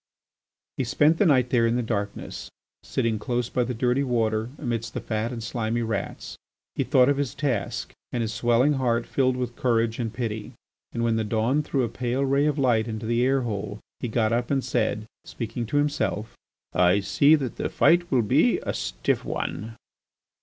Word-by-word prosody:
He - - 0
spent 145 +6 +3
the 205 - +5
night 130 -4 +3
there 115 -3 +4
in 115 - +1
the 125 - 0
darkness, 100 -3 -4 0.3
sitting 115 -2 -1
close 120 +2 -1
by 125 - +1
the 125 +1 -3
dirty 125 +3 +1
water 115 -3 0
amidst 115 -3 -3
the - - -1
fat 110 +1 -2
and 115 -2 -5
slimy 115 0 -1
rats. 115 -1 -4 0.3
He - - 0
thought 125 -1 +4
of 140 -1 +2
his 140 -3 -2
task, 120 -6 -2 0.2
and 120 - -1
his 110 -1 -3
swelling 120 +5 +3
heart 120 -4 +1
filled 130 -2 +1
with 125 -1 -3
courage 115 -2 +1
and 115 -2 -2
pity. 110 -2 -4 0.4
And 115 - -2
when 115 -1 +2
the 110 - 0
dawn 115 +7 +1
threw 140 -3 -1
a - - +1
pale 125 +3 -1
ray 140 +2 +2
of 150 -1 0
light 120 -5 +2
into 110 0 -4
the 120 +2 +1
air 135 +1 +2
hole 105 -3 -4 0.2
he 125 - -3
got 110 0 +1
up 120 0 0
and 135 -2 +1
said, 105 - -1 0.2
speaking 115 0 -5
to 145 - 0
himself: 145 -7 -1 0.4
"I 90 +2 +4
see 140 +9 +5
that 135 -6 -3
the - - -2
fight 175 +1 +3
will 125 -4 +3
be 105 - +3
a - - -2
stiff - - -1
one." 110 +1 -4
120 Hz, 195 wpm, -25 LUFS, 110-130 Hz, 0.4 s, the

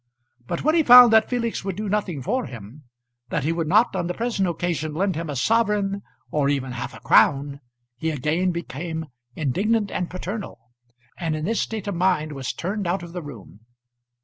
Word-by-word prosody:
But 170 - -3
when 310 - +3
he 335 - +4
found 245 -4 +9
that 220 0 +5
Felix 235 -5 -2
would 195 -2 -3
do 210 +2 -4
nothing 190 -9 -2
for 250 - -1
him; 120 +5 -11 0.4
that 150 - -1
he 155 - +1
would 165 -1 -2
not 215 +6 +3
on 175 -2 -1
the 180 - -3
present 225 -6 0
occasion 160 -3 -2
lend 190 +2 0
him 165 0 -4
a 145 - -3
sovereign, 205 - +1 0.3
or 145 -2 +1
even 135 -2 -1
half 120 -1 -6
a - - -11
crown, 140 0 +3 0.4
he 160 +5 -2
again 155 +5 0
became 165 -1 -4 0.3
indignant 200 - 0
and 180 - -2
paternal, 185 - -6 0.6
and 165 -3 -1
in 155 0 -3
this 225 +4 0
state 220 -3 -4
of 200 - -1
mind 175 -3 +1
was 135 -3 -4
turned 195 +2 -3
out 175 +1 -1
of 170 -1 -10
the 180 - -4
room. 120 - -11
175 Hz, 195 wpm, -23 LUFS, 150-205 Hz, 0.6 s, found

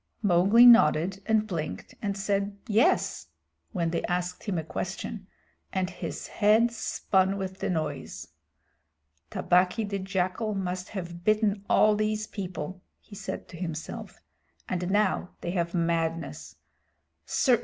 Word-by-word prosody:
Mowgli 200 +5 +6
nodded 195 -4 +6
and 220 -1 +3
blinked, 170 -7 -5
and 200 -1 -2
said 200 0 -1
"Yes" 220 +2 +2 0.4
when 170 -5 -1
they 170 - 0
asked 180 +2 -2
him 200 -5 -1
a 160 - -1
question, 190 +4 -5 0.4
and 185 -1 -1
his 180 - -6
head 220 +3 +3
spun 195 -4 +1
with 190 -1 -5
the - - -2
noise. 155 -5 -3 1.0
"Tabaqui 180 +5 +2
the 200 -1 -2
Jackal 190 +3 -1
must 185 -1 -3
have 175 -1 -6
bitten 215 -1 +2
all 215 0 +5
these 215 0 0
people," 185 -3 -6 0.2
he - - -18
said 205 - -6
to 170 - -10
himself, 165 -2 -6 0.5
"and 180 0 -2
now 205 -3 +1
they 175 - -3
have 170 -1 -1
madness. 165 -1 -1
190 Hz, 130 wpm, -28 LUFS, 175-210 Hz, 1.0 s, Mowgli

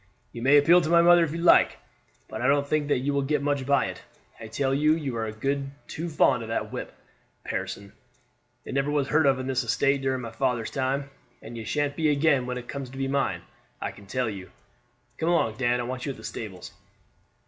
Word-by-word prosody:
"You 115 - -8
may 135 +4 +6
appeal 170 +5 +6
to 160 - -2
my 170 0 +5
mother 175 0 +7
if 160 - -2
you 165 - -4
like, 170 +1 +5 0.5
but - - -6
I 125 - +1
don't 140 0 +2
think 150 0 0
that 135 -4 +1
you 145 +2 -1
will 140 - +1
get 140 +1 0
much 145 -2 -1
by 140 0 +3
it. - - -6 0.4
I 115 - -8
tell 135 +4 -1
you 150 +3 +3
you 140 -6 -4
are 110 -1 -2
a - - -4
deal 135 +5 -2 0.2
too 170 +2 -5
fond 150 -5 +3
of 110 - -7
that 115 - -2
whip, - - -6 0.5
Pearson. 100 0 -5 0.7
It - - -6
never 140 +1 0
was 145 -2 0
heard 155 -1 +3
of 135 -1 +4
on 130 - -4
the 135 - -2
estate 135 +2 +1
during 130 -1 -1
my 115 -2 -6
father's 120 -1 -1
time, 135 +1 -2 0.3
and 120 - -9
it 115 -1 -6
sha'n't 145 +4 -1
be 155 0 +1
again 140 -3 +2
when 125 0 -3
it 120 -1 -8
comes 140 -2 -6
to 135 - -11
be 135 0 -1
mine, 140 0 -1 0.4
I - - -3
can 100 - -16
tell 125 +3 -1
you. 95 -4 -6 0.7
Come 165 - 0
along, 115 -11 +1
Dan; 125 -1 +1
I - - -1
want 125 +2 -5
you 140 - -2
at - - -15
the 110 - -13
stables." 105 -4 -7
135 Hz, 235 wpm, -26 LUFS, 125-145 Hz, 0.7 s, mother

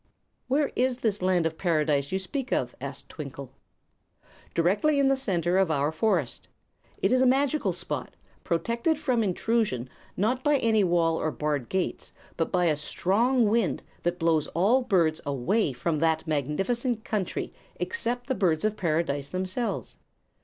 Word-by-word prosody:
"Where 280 +3 +1
is 255 0 +1
this 210 -3 0
Land 180 -2 +2
of 160 0 -2
Paradise 150 -5 +1
you 190 - +1
speak 255 +7 -4
of?" 120 -1 0
asked 140 0 -6
Twinkle. 140 -3 -8 1.0
"Directly 205 - +2
in 275 -1 +4
the 270 - +4
center 185 -8 +1
of 190 -3 +3
our 145 -1 +1
forest. 165 - -1 0.5
It 195 - +1
is 255 0 +4
a 260 - +5
magical 280 +3 +2
spot, - - -5 0.3
protected 235 - 0
from 255 -6 +1
intrusion 205 - 0 0.3
not 250 +6 0
by 295 -1 +4
any 220 -4 +3
wall 170 -2 +2
or 155 - 0
barred 150 -5 -2
gates, 190 -1 -2 0.2
but 165 - -1
by 180 -2 +2
a 155 -3 +3
strong 220 - +1
wind 220 -4 +1 0.2
that 175 +1 -1
blows 165 -3 +2
all 210 +10 +4
birds 170 -9 +2
away 145 - 0
from 150 +5 -2
that 160 0 +1
magnificent 195 - -1
country 210 -5 -3 0.2
except 245 - -2
the 260 - -1
Birds 175 -7 +1
of 215 0 +1
Paradise 155 -6 -1
themselves. 185 +6 -3
185 Hz, 155 wpm, -27 LUFS, 160-235 Hz, 1.0 s, a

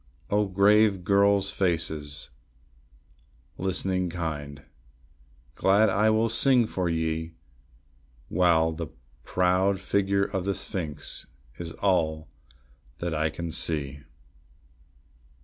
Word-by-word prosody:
O 105 0 +2
grave 100 0 +4
girls' 100 +1 +3
faces, 80 -7 -2 1.3
listening 95 0 -1
kind! 75 -4 -5 0.9
glad 100 +6 +3
will 110 +1 +3
I - - +1
sing 120 +1 +3
for 95 -5 -2
ye, 80 0 -2 0.9
While 85 -3 +3
the 80 - -5 0.4
proud 95 +2 +1
figure 100 0 +1
of 95 -2 -2
the 100 -1 0
sphinx 90 -7 -4 0.3
is 85 -2 -5
all 80 -5 0 0.7
that 85 -1 -3
I 80 0 +1
can 85 +1 -5
see. 75 -4 -1
90 Hz, 95 wpm, -26 LUFS, 80-100 Hz, 1.3 s, grave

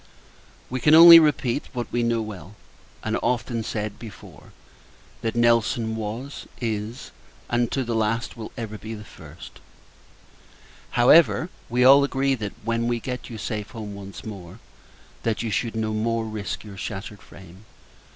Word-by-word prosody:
We 130 - -4
can 150 +5 +5
only 165 0 +11
repeat 145 -4 0
what 120 -3 -5
we 120 - 0
knew 115 -1 0
well, 105 -2 -9 0.5
and - - -1
often 120 -1 -1
said, 105 -1 -4
before 110 -4 -12 0.7
that 115 0 -2
Nelson 115 -1 +2
was, 110 +6 -6
is, 115 +1 -4 0.4
and 120 -1 +1
to 135 - -1
the 120 -1 -3
last 115 +1 -1
will 110 -2 -8
ever 110 -3 -6
be, 110 +1 -7
the 105 - -10
first. - - -13 1.4
However, 160 +7 +5 0.2
we 125 +1 +2
all 140 +2 +8
agree 135 0 0
that, 105 -5 -4
when 115 +1 -1
we 120 -1 0
get 125 +3 -6
you 115 - -7
safe 105 -1 -4
home 110 -4 -7
once 100 -1 -10
more 95 -3 -9 0.6
that 115 0 -1
you 115 - -3
should 110 +4 -2
never 110 -1 -2
more 115 +1 -1
risk 110 -2 -5
your 100 -2 -11
shattered 100 0 -6
frame. 95 +2 -15
115 Hz, 155 wpm, -24 LUFS, 105-120 Hz, 1.4 s, only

